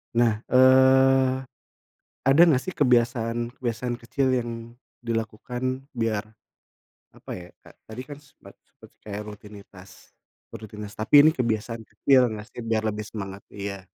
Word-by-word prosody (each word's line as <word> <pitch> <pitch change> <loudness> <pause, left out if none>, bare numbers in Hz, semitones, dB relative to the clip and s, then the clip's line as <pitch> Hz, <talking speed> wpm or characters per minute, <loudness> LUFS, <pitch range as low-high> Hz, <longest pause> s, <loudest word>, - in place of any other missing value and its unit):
Nah, 115 -2 +2
eee, 130 0 +5 0.8
ada 135 +4 +3
nggak 140 -5 +3
sih 185 - -4
kebiasaan-kebiasaan 120 -1 0
kecil 120 +4 -1
yang 120 -1 -5 0.5
dilakukan, 120 +3 -3
biar 115 -3 -1 0.9
apa - - -14
ya, 90 -1 -10
Kak, - - -18
tadi 110 +3 -9
kan 145 - -8
sepet 145 -1 -18
seperti - - -20
kayak 105 0 -5
rutinitas, 100 -3 -14 0.4
rutinitas, 105 -1 -10
tapi 110 +7 +6
ini 155 +2 +7
kebiasaan 115 -1 -2
kecil 130 +5 +3
nggak 105 0 -7
sih, - - -9
biar 115 -1 0
lebih 105 0 -4
semangat? 100 -2 -8
Iya 100 -1 -6
115 Hz, 130 wpm, -25 LUFS, 105-130 Hz, 0.9 s, ini